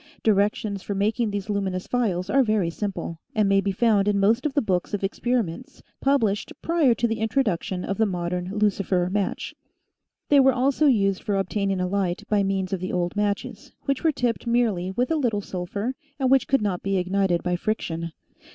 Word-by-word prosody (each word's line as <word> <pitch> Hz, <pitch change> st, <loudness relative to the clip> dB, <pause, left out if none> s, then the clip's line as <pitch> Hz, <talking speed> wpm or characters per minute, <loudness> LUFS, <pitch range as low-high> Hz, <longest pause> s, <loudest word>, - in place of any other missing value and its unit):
Directions 205 Hz, -1 st, +1 dB
for 200 Hz, -, -4 dB
making 215 Hz, +3 st, +1 dB
these 200 Hz, -1 st, -4 dB
luminous 195 Hz, -3 st, -2 dB
phials 195 Hz, -8 st, -1 dB
are 270 Hz, +7 st, +3 dB
very 215 Hz, -8 st, +1 dB
simple, 185 Hz, -3 st, -4 dB, 0.2 s
and 215 Hz, -2 st, +3 dB
may 195 Hz, 0 st, +4 dB
be 195 Hz, -, -1 dB
found 205 Hz, 0 st, +2 dB
in 205 Hz, -1 st, +2 dB
most 230 Hz, +8 st, +3 dB
of 275 Hz, -, -7 dB
the 285 Hz, -, +3 dB
books 185 Hz, 0 st, 0 dB
of 200 Hz, -, -5 dB
experiments 240 Hz, -, -2 dB, 0.2 s
published 225 Hz, -7 st, +1 dB
prior 320 Hz, -8 st, +3 dB
to 235 Hz, +2 st, +1 dB
the 225 Hz, 0 st, -2 dB
introduction 210 Hz, -6 st, -1 dB
of 195 Hz, +2 st, -3 dB
the 220 Hz, -, +4 dB
modern 180 Hz, -1 st, -3 dB
lucifer 195 Hz, -3 st, +1 dB
match. 205 Hz, 0 st, -2 dB, 0.8 s
They 285 Hz, -, +6 dB
were 265 Hz, 0 st, +5 dB
also 275 Hz, +4 st, +2 dB
used 195 Hz, -7 st, +2 dB
for 205 Hz, -, -1 dB
obtaining 195 Hz, 0 st, -1 dB
a 180 Hz, -, 0 dB
light 185 Hz, -2 st, -1 dB
by 210 Hz, -1 st, +2 dB
means 195 Hz, -1 st, -1 dB
of 190 Hz, -, -1 dB
the 185 Hz, +1 st, -4 dB
old 175 Hz, 0 st, -1 dB
matches, 205 Hz, -1 st, -2 dB
which 275 Hz, +1 st, -1 dB
were 320 Hz, -, +4 dB
tipped 245 Hz, -4 st, -2 dB
merely 225 Hz, -7 st, +1 dB
with 245 Hz, +9 st, -1 dB
a 320 Hz, -, +2 dB
little 235 Hz, -8 st, 0 dB
sulphur, 200 Hz, +6 st, -4 dB, 0.3 s
and 260 Hz, -1 st, +1 dB
which 270 Hz, -1 st, +4 dB
could 270 Hz, -5 st, +2 dB
not 190 Hz, -4 st, -1 dB
be 195 Hz, 0 st, 0 dB
ignited 185 Hz, -1 st, +1 dB
by 180 Hz, 0 st, 0 dB
friction. 170 Hz, -4 st, -3 dB
205 Hz, 195 wpm, -24 LUFS, 185-235 Hz, 0.8 s, They